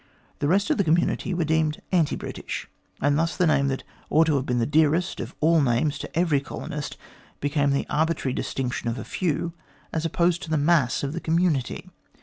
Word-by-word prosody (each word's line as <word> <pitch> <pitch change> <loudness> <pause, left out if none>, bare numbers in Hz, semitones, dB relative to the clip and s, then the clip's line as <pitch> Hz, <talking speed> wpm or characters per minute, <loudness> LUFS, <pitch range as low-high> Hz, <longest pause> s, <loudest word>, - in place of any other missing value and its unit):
The 145 - 0
rest 200 - +2
of 300 - +1
the - - +4
community 170 +3 +1
were 175 -1 0
deemed 160 -1 +1
anti 170 -5 +2
British, - - -6 0.3
and 145 +2 +3
thus 165 0 0
the 180 - +3
name 140 -3 +3
that 135 -1 -2 0.3
ought 160 - +5
to 160 -2 +2
have 135 - -3
been 125 - +1
the 115 - +2
dearest 160 +5 +2
of - - -6
all 160 +1 +4
names 135 +3 +1
to - - -7
every 165 -5 +3
colonist, 145 +1 -6 0.4
became 145 0 +1
the 140 0 +1
arbitrary 155 -3 0
distinction 130 -3 -2
of 115 - -2
the - - -6
few, 170 -1 -1 0.4
as 160 - -1
opposed 170 +2 +1
to 165 - -7
the 160 - +2
mass 145 -5 +2
of 140 +1 -2
the 170 - -4
community. 165 -6 0
155 Hz, 200 wpm, -25 LUFS, 140-170 Hz, 0.4 s, ought